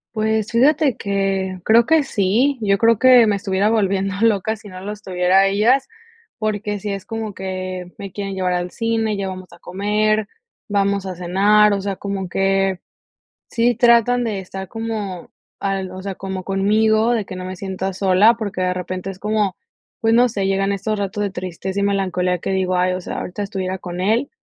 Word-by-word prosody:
Pues, 220 0 0
fíjate 275 +2 +3
que, 195 -2 -1
creo 230 +1 +5
que 320 -1 +4
sí, 240 +6 +1
yo 200 -2 +2
creo 230 0 +3
que 255 -2 +7
me 210 -2 +2
estuviera 200 +1 0
volviendo 195 -3 +1
loca 220 -1 +2
si 215 -1 -14
no 185 -1 -9
los 210 +2 -6
tuviera 180 -1 +2
a 195 - +5
ellas, 225 +7 +2 0.5
porque 210 -1 -2
sí 205 +1 -4
es 195 -1 -4
como 225 -2 -4
que 185 -1 -5
me 195 -1 -7
quieren 195 0 -5
llevar 185 -1 0
al 180 0 -2
cine, 225 0 -1
ya 195 -1 -2
vamos 185 0 -8
a 170 - -14
comer, 210 +4 0 0.4
vamos 200 -1 0
a 185 - -5
cenar, 200 +4 +3
o 200 - -1
sea, 195 0 -3
como 195 -1 -4
que 195 0 +1 0.7
sí 240 +1 +2
tratan 240 +1 +4
de 215 -4 -2
estar 190 0 -8
como 215 -5 -5 0.3
al, 195 -1 -2
o 185 +1 -8
sea, 195 0 -4
como 190 0 -6
conmigo, 215 +4 +2
de 225 -3 0
que 185 -1 -8
no 185 0 -6
me 185 0 -6
sienta 190 0 -4
sola, 195 +4 +4
porque 205 -5 -5
de 180 0 +1
repente 185 +1 -5
es 190 -1 -7
como, 210 -2 0 0.5
pues 225 0 +3
no 245 +2 +5
sé, 200 -4 -2
llegan 195 +1 +1
estos 205 +2 -2
ratos 200 +1 -2
de 200 - -1
tristeza 185 +1 -4
y - - 0
melancolía 185 -2 0
que 170 - -4
digo, 185 -1 0
ay, 180 +1 +2
o 185 - -3
sea, - - -6
ahorita 185 +3 -5
estuviera 190 -2 -3
con 180 -1 -7
él, 225 +8 +1
200 Hz, 195 wpm, -20 LUFS, 190-215 Hz, 0.7 s, que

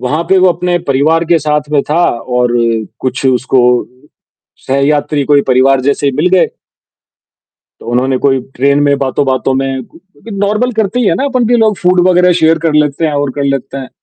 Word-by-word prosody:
वहाँ 150 +6 -2
पे 190 - +3
वो 185 0 +4
अपने 175 +1 -1
परिवार 155 +5 +1
के 170 0 +2
साथ 150 0 -2
में 145 - +2
था 170 +3 +2 0.3
और 125 -1 +1 0.5
कुछ 130 +1 -3
उसको 130 0 +1 1.1
सहयात्री 145 +1 0
कोई 145 0 +3
परिवार 130 +1 +2
जैसे 140 +2 -1
ही 140 - +1
मिल 160 +4 +1
गए। 185 -1 +2 1.3
तो - - -13
उन्होंने 130 +2 0
कोई 135 -1 +2
ट्रेन 140 +2 +1
में 140 - +2
बातों-बातों 135 0 -1
में 135 0 -2
उ 130 - -12 0.3
नॉर्मल 210 +5 -1
करते 220 +2 -1
ही 235 - 0
है 170 - +2
ना 190 - -2
अपन 255 -3 0
भी 240 +2 +2
लोग 220 -3 +1
फूड 180 0 +2
वग़ैरह 180 0 +3
शेयर 160 +1 +3
कर 165 - +1
लेते 150 +1 +1
हैं 155 - -2
और 145 -1 -1
कर 145 - -2
लेते 135 -1 -3
हैं। 130 - -8
145 Hz, 195 wpm, -12 LUFS, 135-180 Hz, 1.3 s, वो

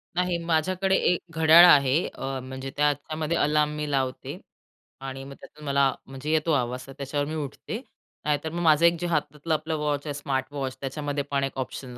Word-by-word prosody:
नाही 180 -1 +1
माझ्याकडे 185 +4 +1
एक 180 -2 +2 0.2
घड्याळ 160 +2 +9
आहे. 145 -1 +5
अ, 135 0 -5
म्हणजे 130 +1 -7
त्याच्यामध्ये 150 +3 0
अलार्म 150 0 +2
मी 150 -1 -3
लावते 130 -2 -2 0.6
आणि 135 0 -6
मग 140 +1 -9
त्यातून 150 0 -13
मला 140 -1 +2
म्हणजे 135 +3 -5
येतो 160 +1 +2
आवाज 125 -1 -1
तर 135 - -10
त्याच्यावर 145 +1 -2
मी 155 - -4
उठते. 145 - -6 0.4
नाहीतर 150 +1 0
मग 170 +2 -3
माझं 160 0 +5
एक 170 0 +4
जे 175 - -2
हातातलं 160 -1 -1
आपलं 155 +1 -1
वॉच 150 -1 -1
आहे, 145 - -2
स्मार्ट 135 -2 -2
वॉच 135 -2 -4
त्याच्यामध्ये 145 +1 -3
पण 140 -1 +1
एक 135 0 -3
ऑप्शन 130 -1 -6
145 Hz, 185 wpm, -26 LUFS, 135-160 Hz, 0.6 s, घड्याळ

